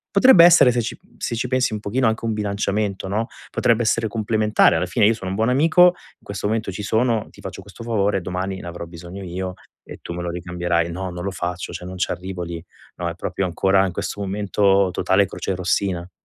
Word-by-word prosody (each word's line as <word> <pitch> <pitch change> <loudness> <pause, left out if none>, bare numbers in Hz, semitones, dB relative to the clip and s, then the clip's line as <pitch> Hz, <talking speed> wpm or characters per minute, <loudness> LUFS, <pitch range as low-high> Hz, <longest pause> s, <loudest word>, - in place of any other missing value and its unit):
potrebbe 200 -5 +8
essere, 170 -7 +7
se 120 0 0
ci 115 - -5 0.2
se 115 - -3
ci 120 +2 -2
pensi 130 -3 +1
un 105 - -4
pochino, 120 +5 +1
anche 110 0 -1
un 115 - 0
bilanciamento, 100 -2 -2
no? 110 +4 -1 0.2
Potrebbe 120 0 +2
essere 115 0 +1
complementare, 110 -3 +2
alla 90 - 0
fine 100 +4 +2
io 115 - +4
sono 95 -4 -6
un - - -2
buon 110 +3 +1
amico, 160 +7 +5
in 180 - -5
questo 100 0 -4
momento 110 -1 -1
ci 105 +3 -6
sono, 110 +1 +1
ti - - -17
faccio - - -7
questo 100 +4 -12
favore, 105 -4 0
domani 95 +2 -4
ne - - -9
avrò 85 0 -6
bisogno 85 +3 -10
io 90 +1 -4 0.3
e - - -11
tu - - -6
me 90 - -5
lo 85 - -3
ricambierai 85 -1 -1
no, 95 +2 -4
non 90 0 -6
lo 100 - -1
faccio, 90 -1 -4
cioè 90 - -7
non 95 +1 -7
ci - - -1
arrivo 90 0 -6
lì. 85 -1 -6 0.3
No, 85 -1 -3
è 85 - -6
proprio 95 - -3
ancora 95 +2 +2
in 95 - -2
questo 100 - -4
momento, 100 -1 +2
totale 100 +1 +2
crocerossina. 90 -1 -2
100 Hz, 220 wpm, -22 LUFS, 90-110 Hz, 0.3 s, potrebbe